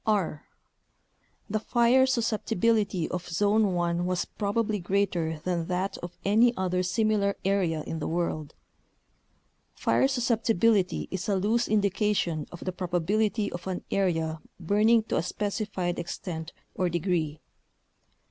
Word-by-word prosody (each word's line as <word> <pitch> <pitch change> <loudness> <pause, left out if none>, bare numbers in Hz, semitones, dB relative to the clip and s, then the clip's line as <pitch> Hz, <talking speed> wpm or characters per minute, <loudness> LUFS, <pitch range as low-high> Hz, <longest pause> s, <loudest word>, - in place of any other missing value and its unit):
r. 190 -8 0 1.0
The 215 +1 -1
fire 240 +4 +4
susceptibility 220 -5 +1
of 180 -1 -4
Zone 205 +2 +2
1 175 0 0
was 180 -1 0
prob 205 0 -3
ably 215 -2 +1
greater 175 -4 0
than 175 -2 -1
that 190 +2 -1
of 175 0 -8
any 230 +4 +4
other 185 -1 0
similar 200 +1 +1
area 180 -6 +1
in 160 - -4
the 150 - -3
world. 160 -3 -2 1.2
Fire - - +2
susceptibility 230 -6 +1
is 190 +2 -3
a 200 - +2
loose 220 +5 +1
indication 200 -6 +1
of 175 - -10
the 185 - -2
probability 195 +4 0
of 175 +2 -7
an 185 -1 -3
area 165 -5 0 0.2
burning 210 +6 +3
to - - -2
a - - +2
specified 195 -1 -2
extent 170 -1 -5 0.2
or 180 -1 0
degree. 170 -3 -1
190 Hz, 130 wpm, -27 LUFS, 175-215 Hz, 1.2 s, fire